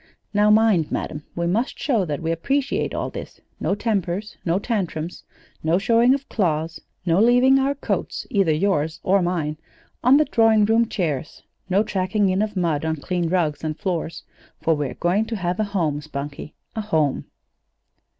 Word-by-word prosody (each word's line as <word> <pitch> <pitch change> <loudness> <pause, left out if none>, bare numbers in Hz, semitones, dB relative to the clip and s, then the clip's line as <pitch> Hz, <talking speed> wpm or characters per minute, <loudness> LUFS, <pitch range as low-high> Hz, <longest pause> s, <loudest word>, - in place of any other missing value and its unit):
Now 210 +1 +4
mind, 210 -7 +4
madam! 150 0 -4
We 170 - -1
must 210 +9 0
show 230 -10 +1
that 150 -4 -3
we 165 - 0
appreciate 275 - 0
all - - -3
this: - - -8 0.2
no 195 - 0
tempers, 205 -2 -2
no 170 +1 +1
tantrums, 180 -7 -3 0.4
no 160 +2 +2
showing 235 +6 +4
of 275 0 -7
claws, 165 -4 -1 0.2
no 175 +2 +3
leaving 250 +3 +5
our 275 +1 +1
coats 280 - -3
either 195 -6 +3
yours 160 -2 0
or 195 +1 +3
mine 165 -4 -1 0.5
on 255 +3 +6
the 305 - +4
drawing 225 -5 +4
room 225 +1 +3
chairs, 155 -7 -3 0.3
no 195 +3 +3
tracking 195 -1 0
in 185 +2 +1
of 215 -2 -2
mud 165 -5 0
on 160 0 0
clean 170 +3 -2
rugs 165 -5 0
and 155 -1 -3
floors! 175 -3 -3 0.4
For 165 - +2
we're 145 -3 -3
going 185 +5 +1
to 225 0 -4
have 180 -1 -2
a 215 - +2
home, 165 -8 -1
Spunkie 145 0 -7 0.2
a 220 - -1
home!" 160 -10 0
185 Hz, 170 wpm, -23 LUFS, 160-215 Hz, 0.5 s, on